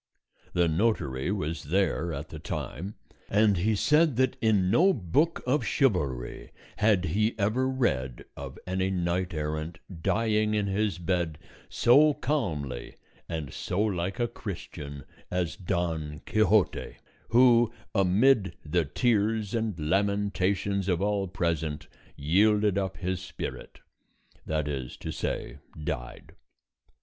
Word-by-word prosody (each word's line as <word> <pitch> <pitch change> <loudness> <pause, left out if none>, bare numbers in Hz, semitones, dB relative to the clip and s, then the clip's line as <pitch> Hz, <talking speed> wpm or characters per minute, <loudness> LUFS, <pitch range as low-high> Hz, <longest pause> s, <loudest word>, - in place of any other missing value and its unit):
The 85 -1 +3
notary 80 - 0
was 85 -6 -3
there 85 0 +1
at 75 0 -5
the 80 - -8
time, 90 - -5 0.3
and 105 -1 +4
he 105 +5 +1
said 150 +6 +3
that 130 +1 +2
in 100 -5 +3
no 180 - +5
book 145 - 0
of 135 +4 +1
chivalry 75 - 0 0.3
had 105 -4 +3
he 105 +7 +1
ever 115 +6 +1
read 65 - -1
of - - -8
any 95 +1 0
knight 90 0 -1
errant 75 +2 -3 0.2
dying 110 +1 +1
in 105 -1 +1
his 100 0 0
bed 85 -3 -1 0.3
so 145 +5 +5
calmly 75 - -2 0.3
and 80 -4 -4
so 90 - -3
like 95 0 0
a 120 - +2
Christian 75 - -7 0.3
as 90 -2 -1
Don 85 -5 -2
Quixote, 110 0 +2 0.3
who 120 -1 +5 0.2
amid 100 +3 +3
the 80 +2 +1
tears 105 - +1
and 110 -5 -1
lamentations 100 +2 0
of 90 -2 +2
all 100 -1 0
present 80 -4 -2 0.3
yielded 105 +6 +3
up 95 -1 -2
his 95 -1 -2
spirit, 90 -2 -7 0.7
that 75 -1 -1
is 65 -4 -4
to - - -5
say, 65 - -4 0.2
died. - - -5
95 Hz, 125 wpm, -28 LUFS, 80-110 Hz, 0.7 s, no